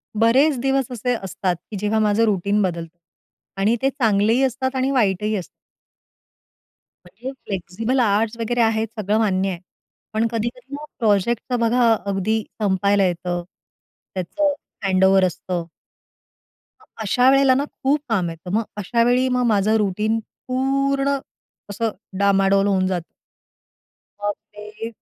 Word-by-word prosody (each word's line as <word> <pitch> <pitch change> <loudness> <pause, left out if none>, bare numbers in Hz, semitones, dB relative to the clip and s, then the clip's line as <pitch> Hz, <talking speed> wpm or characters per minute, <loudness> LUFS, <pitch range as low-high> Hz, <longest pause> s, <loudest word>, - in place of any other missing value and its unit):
बरेच 255 +7 +4
दिवस 270 +1 +1
असे 245 +1 -1
असतात, 185 -1 -1
की 185 +5 -9
जेव्हा 210 +2 +1
माझं 215 +1 +3
रुटीन 205 0 +1
बदलतं. 170 -3 -3 0.6
आणि 210 +4 +3
ते 270 - +3
चांगलेही 225 -2 +2
असतात 260 +1 -1
आणि 260 +1 +1
वाईटही 210 -4 +1
असतात. 185 -4 -4 1.6
म्हणजे 260 +2 -8
फ्लेक्सिबल 200 +7 -2
आवरझ 220 0 +1
वगैरे 240 +1 0
आहेत 225 0 +2
सगळं 210 +1 +1
मान्य 195 -3 +1
आहे. 180 -3 -4 0.5
पण 220 +1 +1
कधी-कधी 240 +4 -4
ना 295 +1 -7
प्रोजेक्टच 230 +3 +1
बघा 235 0 +3
अगदी 200 +3 0 0.2
संपायला 200 0 +2
येतं, 175 0 -2 0.7
त्याच 180 -2 -5 0.5
हँडओव्हर 190 0 +4
असतं. 180 0 -3 1.2
मग - - -20 0.2
अशा 250 +5 +4
वेळेला 275 -1 +5
ना 275 - +1 0.2
खूप 280 +3 +3
काम 190 -6 +1
येतं. 165 +2 -9
मग 225 +2 +2
अशावेळी 240 +5 +2
मग 250 - +1
माझं 210 +2 +2
रुटीन 210 +2 0 0.3
पूर्ण, 275 +2 +1 0.5
असं 220 +2 -1 0.3
डामाडोल 195 0 +3
होऊन 190 -2 +2
जातं. 180 -3 -1 1.2
मग 205 0 +1 0.2
ते 210 +2 -8
215 Hz, 130 wpm, -21 LUFS, 195-245 Hz, 1.6 s, वेळेला